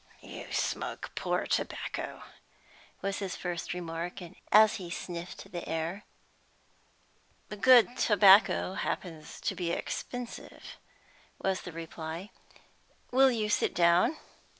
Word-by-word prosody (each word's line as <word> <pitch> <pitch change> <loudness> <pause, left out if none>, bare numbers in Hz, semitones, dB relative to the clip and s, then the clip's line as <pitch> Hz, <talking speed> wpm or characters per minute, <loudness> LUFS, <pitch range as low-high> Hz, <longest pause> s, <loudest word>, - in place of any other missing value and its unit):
"You - - -9
smoke - - -2
poor - - -1
tobacco," - - -3 0.8
was 195 0 -1
his 195 -2 -4
first 175 -2 -4
remark, 170 0 -4 0.3
as 215 +1 +7
he 180 -4 -7
sniffed 175 0 -7
the 175 - -6
air. 165 +6 -3 1.4
"Good 245 +3 +5
tobacco 200 -2 +5
happens 165 -5 -5
to - - -1
be 175 -2 -3
expensive," 245 +6 -6 0.6
was 190 -1 -1
the 180 - -8
reply. 165 +3 -7 0.8
"Will 265 +1 +6
you 225 -4 0
sit 210 - +1
down?" 175 - +4
185 Hz, 105 wpm, -30 LUFS, 170-210 Hz, 1.4 s, as